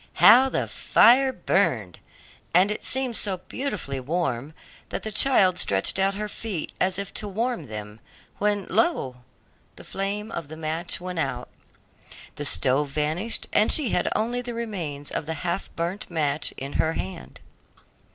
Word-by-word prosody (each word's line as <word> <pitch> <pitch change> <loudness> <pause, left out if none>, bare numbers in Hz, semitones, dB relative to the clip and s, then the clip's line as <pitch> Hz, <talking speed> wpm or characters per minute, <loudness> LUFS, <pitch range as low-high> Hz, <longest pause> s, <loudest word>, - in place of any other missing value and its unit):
How 265 +2 +7
the - - -1
fire 260 +3 +4
burned! 130 - 0 0.6
and 195 +4 +4
seemed 260 -2 +1
so 195 -4 0
beautifully 180 - -4
warm 150 -1 -2 0.3
that - - -4
the 220 - -3
child 195 -6 +4
stretched 95 - +2
out 195 +1 +2
her 210 +1 -3
feet 205 -5 -5
as 185 0 +2
if 200 0 -5
to 210 - -2
warm 215 - -2
them, 105 0 -8 0.4
when, 205 -2 0
lo! 135 - +1 0.6
the - - -11
flame 205 +3 -4
of 170 -8 -5
the 155 +2 -9
match 160 +2 -2
went 180 -1 -5
out, 125 -4 -3 0.8
the 145 - -5
stove 140 +1 +2
vanished, 155 +10 -1
and 215 - +4
she 290 -7 +7
had 180 - +1
only 240 +3 -1
the 240 -1 -6
remains 170 -11 -5
of 150 - -3
the 160 - -3
half 175 +3 -2
burnt 175 +4 -3
match 150 -3 0
in 135 +1 -6
her 160 0 0
hand. 185 -1 -7
180 Hz, 155 wpm, -25 LUFS, 150-210 Hz, 0.8 s, How